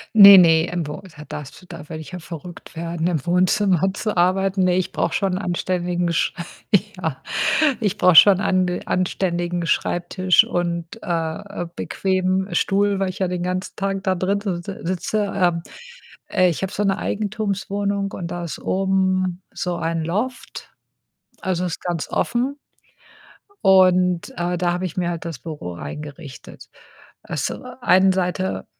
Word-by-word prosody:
Ne, 200 Hz, -2 st, +11 dB
ne, 165 Hz, -2 st, +5 dB
im 175 Hz, -3 st, -2 dB
Wo 150 Hz, -, -7 dB
da 150 Hz, -, -10 dB
darfst 140 Hz, -2 st, -8 dB
du 185 Hz, -, -18 dB
da 165 Hz, -4 st, -10 dB
würde 155 Hz, -1 st, -6 dB
ich 160 Hz, -, -10 dB
ja 180 Hz, -, -5 dB
verrückt 170 Hz, +1 st, -10 dB
werden, 165 Hz, 0 st, -3 dB
im 160 Hz, -6 st, -1 dB
Wohnzimmer 185 Hz, +1 st, +2 dB
zu 210 Hz, +1 st, -3 dB
arbeiten, 185 Hz, +2 st, +2 dB
ne, 180 Hz, -1 st, +3 dB
ich 185 Hz, -, -1 dB
brauche 165 Hz, -, -1 dB
schon 195 Hz, -2 st, 0 dB
'n -, -, -1 dB
anständigen 175 Hz, -2 st, -1 dB
Sch 165 Hz, -, +1 dB, 0.6 s
ja, 160 Hz, -7 st, -4 dB, 0.6 s
ich 205 Hz, -2 st, -1 dB
brauche 180 Hz, -1 st, +5 dB
schon 190 Hz, +3 st, +8 dB
ande 185 Hz, -2 st, +1 dB
anständigen 175 Hz, -1 st, -1 dB
Schreibtisch 175 Hz, +3 st, +2 dB
und, 170 Hz, +3 st, -3 dB
äh, -, -, -10 dB, 0.6 s
äh, -, -, -4 dB
bequemen 185 Hz, 0 st, -1 dB
Stuhl, 200 Hz, +2 st, +2 dB
weil 195 Hz, -1 st, 0 dB
ich 185 Hz, -, -9 dB
ja 190 Hz, -, 0 dB
den 180 Hz, -1 st, -3 dB
ganzen 185 Hz, +1 st, -3 dB
Tag 195 Hz, -1 st, -2 dB
da 190 Hz, -, +2 dB
drin 190 Hz, +3 st, 0 dB
si 195 Hz, -4 st, -2 dB
si 195 Hz, -, -6 dB
sitze. 185 Hz, +4 st, -1 dB
Ähm, 175 Hz, -3 st, +2 dB, 0.7 s
äh, 185 Hz, -1 st, +3 dB
ich 165 Hz, -, -4 dB
habe 190 Hz, -, -2 dB
so 205 Hz, -, -2 dB
'ne 195 Hz, -1 st, +2 dB
Eigentumswohnung, 200 Hz, -1 st, -2 dB
und 175 Hz, -3 st, -5 dB
da 175 Hz, 0 st, -4 dB
ist 160 Hz, -5 st, -6 dB
oben 185 Hz, -1 st, 0 dB
so 180 Hz, -1 st, -3 dB
ein 165 Hz, -1 st, -2 dB
Loft. 215 Hz, +10 st, -4 dB, 0.7 s
Also, 185 Hz, -2 st, -1 dB
ist 175 Hz, -, -4 dB
ganz 175 Hz, -3 st, -3 dB
offen 255 Hz, +4 st, -1 dB, 1.1 s
und, 185 Hz, -2 st, +4 dB
äh, 175 Hz, 0 st, -1 dB
da 175 Hz, 0 st, +1 dB
habe 180 Hz, +1 st, -3 dB
ich 170 Hz, -, -8 dB
mir 175 Hz, -2 st, 0 dB
halt 170 Hz, -2 st, -5 dB
das 165 Hz, -5 st, -5 dB
Büro 150 Hz, -, -7 dB
reingerichtet. 145 Hz, -, -9 dB, 0.5 s
Also, -, -, -4 dB
äh, 250 Hz, 0 st, -10 dB
einen 190 Hz, -3 st, +5 dB
Seite 185 Hz, 0 st, -2 dB
180 Hz, 165 wpm, -21 LUFS, 170-195 Hz, 1.1 s, Ne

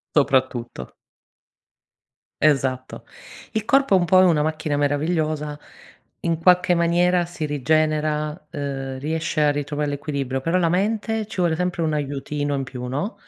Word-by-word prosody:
Soprattutto. 130 Hz, -, 0 dB, 1.5 s
Esatto. 130 Hz, -4 st, +1 dB, 0.5 s
Il 220 Hz, -1 st, -1 dB
corpo 275 Hz, -2 st, +3 dB
è 190 Hz, -, +6 dB
un 175 Hz, -, +1 dB
po' 185 Hz, +2 st, +5 dB
è 185 Hz, -, +6 dB
una 160 Hz, -4 st, +3 dB
macchina 155 Hz, -1 st, -1 dB
meravigliosa, 150 Hz, +1 st, -1 dB, 0.6 s
in 165 Hz, -1 st, -1 dB
qualche 180 Hz, 0 st, +4 dB
maniera 175 Hz, +1 st, +2 dB
si 170 Hz, -2 st, -6 dB
rigenera, 155 Hz, +1 st, +1 dB, 0.2 s
uhm, 135 Hz, -2 st, -4 dB
riesce 160 Hz, +2 st, -2 dB
a 145 Hz, -, +4 dB
ritrovare 145 Hz, 0 st, -2 dB
l'equilibrio 140 Hz, -2 st, -3 dB
però 165 Hz, +6 st, +1 dB
la 170 Hz, -2 st, +2 dB
mente, 215 Hz, +4 st, 0 dB
ci 220 Hz, -, -10 dB
vuole 170 Hz, -2 st, +2 dB
sempre 180 Hz, 0 st, -2 dB
un 155 Hz, -1 st, 0 dB
aiutino 145 Hz, 0 st, -2 dB
in 135 Hz, -, -1 dB
più 125 Hz, -1 st, -7 dB
no. 145 Hz, -, -3 dB
155 Hz, 145 wpm, -22 LUFS, 145-175 Hz, 1.5 s, è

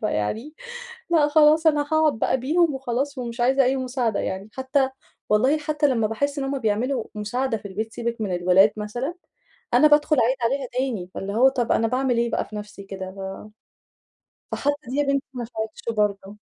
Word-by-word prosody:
فيعني 220 Hz, -, -2 dB, 0.6 s
لأ 320 Hz, -4 st, +4 dB
خلاص، 310 Hz, +2 st, +5 dB
أنا 295 Hz, -2 st, +4 dB
هاقعد 310 Hz, -7 st, +3 dB
بقى -, -, +2 dB
بيهم 310 Hz, +4 st, +2 dB
وخلاص 265 Hz, +2 st, -2 dB
ومش 240 Hz, -1 st, -5 dB
عايزة 265 Hz, +3 st, +4 dB
أي 260 Hz, +1 st, +1 dB
مساعدة 250 Hz, -4 st, -1 dB
يعني. 190 Hz, +3 st, -4 dB
حتى 265 Hz, 0 st, +1 dB, 0.4 s
والله 255 Hz, +8 st, +3 dB
حتى 300 Hz, 0 st, 0 dB
لما 230 Hz, -5 st, +1 dB
باحس 280 Hz, +7 st, -2 dB
إن -, -, -2 dB
هم 270 Hz, 0 st, -2 dB
بيعملوا 230 Hz, +3 st, 0 dB
مساعدة 225 Hz, +4 st, -1 dB
في 205 Hz, -, -9 dB
البيت، 215 Hz, +3 st, -5 dB
سيبِك 235 Hz, -1 st, -3 dB
من 190 Hz, -4 st, -1 dB
الولاد 185 Hz, +4 st, +5 dB
مثلًا، 240 Hz, +10 st, -4 dB, 0.6 s
أنا 305 Hz, -, +7 dB
بادخل 295 Hz, 0 st, +4 dB
أعيد 250 Hz, +3 st, +2 dB
عليها 265 Hz, +2 st, 0 dB
تاني، 245 Hz, -8 st, -2 dB
فاللي 195 Hz, +1 st, -5 dB
هو 255 Hz, +5 st, +5 dB
طب 245 Hz, -3 st, -1 dB
أنا 225 Hz, -, +3 dB
باعمل 255 Hz, +1 st, 0 dB
ليه 235 Hz, 0 st, 0 dB
بقى -, -, -1 dB
في 215 Hz, -, -11 dB
نفسي 210 Hz, -1 st, -8 dB
كده؟ 190 Hz, -1 st, -7 dB
ف 195 Hz, +2 st, -8 dB, 1.1 s
فحتى 290 Hz, +1 st, +1 dB
دي 255 Hz, -, -4 dB
يا 290 Hz, -, +3 dB
بنتي 275 Hz, +1 st, 0 dB
ما 250 Hz, -2 st, -4 dB
نفعتش 220 Hz, -1 st, -6 dB, 0.2 s
برضه. 200 Hz, -1 st, -1 dB
245 Hz, 185 wpm, -23 LUFS, 210-275 Hz, 1.1 s, أنا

